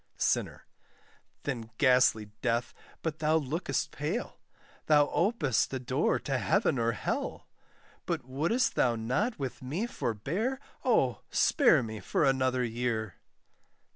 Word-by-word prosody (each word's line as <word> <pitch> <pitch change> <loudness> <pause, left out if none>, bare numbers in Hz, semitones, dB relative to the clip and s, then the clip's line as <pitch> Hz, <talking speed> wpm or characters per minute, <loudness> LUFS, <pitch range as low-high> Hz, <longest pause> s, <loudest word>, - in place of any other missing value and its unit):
SINNER. - - 0 0.8
Then 120 -5 -4
ghastly 125 -6 +4
Death, 120 0 0 0.3
but 160 -2 -3
thou 155 0 +2
look'st 155 +3 -2
pale, - - -4 0.5
Thou 150 -2 +5
ope'st 170 - +1
a 135 - -2
door 130 0 +1
to - - -1
heaven 135 - +2
or 115 0 +1
hell; - - -3 0.6
But - - -2
woulst 170 - 0
thou 120 -2 +2
not 130 - -1
with 135 0 -5
me 150 - -2
forbear, 190 - -2 0.2
Oh! - - +2
spare 240 - +4
me 110 -1 -6
for 150 - 0
another 130 -1 +2
year. 115 -4 -2
130 Hz, 125 wpm, -30 LUFS, 120-160 Hz, 0.8 s, Thou